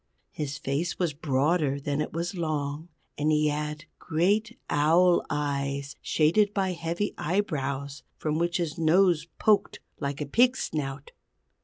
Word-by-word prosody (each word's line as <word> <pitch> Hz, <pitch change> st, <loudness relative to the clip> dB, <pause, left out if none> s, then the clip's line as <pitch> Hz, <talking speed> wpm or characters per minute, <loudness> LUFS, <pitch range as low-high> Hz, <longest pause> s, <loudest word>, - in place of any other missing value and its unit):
His 145 Hz, -2 st, -4 dB
face 145 Hz, +6 st, -2 dB
was 175 Hz, -5 st, 0 dB
broader 145 Hz, 0 st, +1 dB
than 140 Hz, +1 st, -1 dB
it -, -, -3 dB
was 170 Hz, +3 st, -3 dB
long, 155 Hz, -2 st, -3 dB, 0.3 s
and 150 Hz, +1 st, +2 dB
he 150 Hz, 0 st, +3 dB
had 150 Hz, +1 st, -3 dB
great 205 Hz, +8 st, +1 dB
owl 170 Hz, +4 st, +4 dB
eyes 140 Hz, -1 st, -2 dB
shaded 200 Hz, +7 st, +2 dB
by 190 Hz, -2 st, +1 dB
heavy 170 Hz, +3 st, -2 dB
eyebrows 140 Hz, -6 st, -2 dB, 0.2 s
from 155 Hz, 0 st, -1 dB
which 170 Hz, 0 st, +1 dB
his 170 Hz, -2 st, -3 dB
nose 165 Hz, 0 st, +3 dB
poked 210 Hz, -2 st, +2 dB, 0.2 s
like 140 Hz, -1 st, -3 dB
a 150 Hz, -, -2 dB
pig's 245 Hz, -, +3 dB
snout. 140 Hz, -2 st, -4 dB
155 Hz, 140 wpm, -27 LUFS, 145-175 Hz, 0.3 s, owl